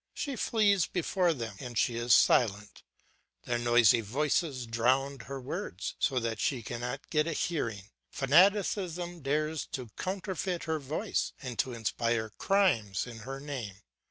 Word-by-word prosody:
She 280 Hz, -2 st, -3 dB
flees 205 Hz, -5 st, +2 dB
before 180 Hz, 0 st, +1 dB
them 115 Hz, -9 st, -5 dB
or 125 Hz, -3 st, -7 dB
she 115 Hz, +1 st, +1 dB
is 120 Hz, +1 st, -1 dB
silent; 105 Hz, -3 st, +2 dB, 0.6 s
their 120 Hz, -1 st, -1 dB
noisy 120 Hz, -1 st, +5 dB
voices 135 Hz, -, 0 dB
drown 130 Hz, +4 st, +1 dB
her 135 Hz, 0 st, -6 dB
words, 115 Hz, -8 st, -5 dB
so 135 Hz, -, +1 dB
that 115 Hz, -3 st, -1 dB
she 130 Hz, -7 st, 0 dB
cannot 120 Hz, +4 st, -5 dB
get 150 Hz, 0 st, +2 dB
a 165 Hz, -, -1 dB
hearing; 115 Hz, -, -2 dB, 0.2 s
fanaticism 175 Hz, +2 st, +2 dB
dares 150 Hz, +2 st, -1 dB
to 130 Hz, -5 st, -4 dB
counterfeit 185 Hz, -1 st, -3 dB
her 160 Hz, -1 st, -1 dB
voice 155 Hz, +10 st, -2 dB
and 125 Hz, -3 st, -6 dB
to 130 Hz, -, 0 dB
inspire 115 Hz, -1 st, -1 dB
crimes 115 Hz, -, +1 dB
in 120 Hz, -2 st, -9 dB
her 135 Hz, +5 st, -6 dB
name. 130 Hz, -9 st, -5 dB
135 Hz, 145 wpm, -30 LUFS, 115-165 Hz, 0.6 s, noisy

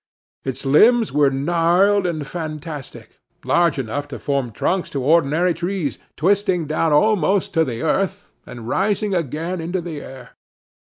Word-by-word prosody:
Its 130 Hz, 0 st, -5 dB
limbs 220 Hz, -, +5 dB
were 145 Hz, -1 st, +3 dB
gnarled 175 Hz, +7 st, +2 dB
and 155 Hz, -4 st, -3 dB
fantastic, 155 Hz, -2 st, -7 dB, 0.3 s
large 170 Hz, -4 st, +2 dB
enough 135 Hz, +3 st, -3 dB
to -, -, -7 dB
form 140 Hz, -3 st, -1 dB
trunks 180 Hz, -, -1 dB
for -, -, -5 dB
ordinary 160 Hz, +5 st, +2 dB
trees, 175 Hz, -2 st, -3 dB, 0.2 s
twisting 190 Hz, 0 st, +1 dB
down 155 Hz, +1 st, 0 dB
almost 200 Hz, +3 st, +2 dB
to 165 Hz, -2 st, +3 dB
the 120 Hz, -3 st, -4 dB
earth, 195 Hz, +5 st, -1 dB, 0.2 s
and 120 Hz, -2 st, -9 dB
rising 205 Hz, -, 0 dB
again 165 Hz, +2 st, -2 dB
into 175 Hz, +3 st, -2 dB
the 165 Hz, -4 st, -6 dB
air. 130 Hz, -1 st, -11 dB
165 Hz, 140 wpm, -21 LUFS, 145-185 Hz, 0.3 s, limbs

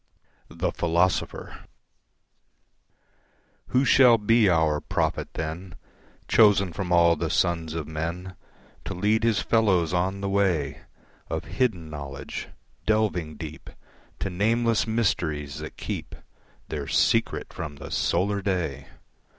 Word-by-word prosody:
The -, -, -2 dB
Philosopher 85 Hz, +1 st, -1 dB, 2.0 s
Who 130 Hz, +2 st, +2 dB
shall 125 Hz, -3 st, +6 dB
be 110 Hz, 0 st, +4 dB
our 80 Hz, -3 st, +2 dB
prophet -, -, -1 dB
then, 80 Hz, +3 st, -5 dB, 0.5 s
Chosen 100 Hz, -5 st, +4 dB
from 90 Hz, 0 st, -4 dB
all 85 Hz, -1 st, +5 dB
the -, -, -2 dB
sons 80 Hz, -2 st, 0 dB
of 80 Hz, -3 st, -4 dB
men 85 Hz, +4 st, -4 dB, 0.5 s
To 95 Hz, -, -4 dB
lead 105 Hz, +4 st, +1 dB
his 115 Hz, -3 st, +2 dB
fellows 95 Hz, -7 st, +2 dB
on 95 Hz, +2 st, 0 dB
the 100 Hz, -, -2 dB
way 95 Hz, -8 st, 0 dB, 0.5 s
Of -, -, -2 dB
hidden 90 Hz, -11 st, -1 dB
knowledge, 70 Hz, -2 st, -6 dB, 0.4 s
delving 100 Hz, -8 st, +1 dB
deep 80 Hz, -1 st, -8 dB, 0.5 s
To 100 Hz, -, -2 dB
nameless 115 Hz, +5 st, +1 dB
mysteries 80 Hz, -10 st, -1 dB
that -, -, -8 dB
keep -, -, -5 dB, 0.5 s
Their 75 Hz, -3 st, -4 dB
secret -, -, +1 dB
from 75 Hz, -2 st, -6 dB
the -, -, -9 dB
solar 100 Hz, +3 st, +1 dB
day! 85 Hz, -8 st, -2 dB
90 Hz, 120 wpm, -26 LUFS, 80-105 Hz, 2.0 s, shall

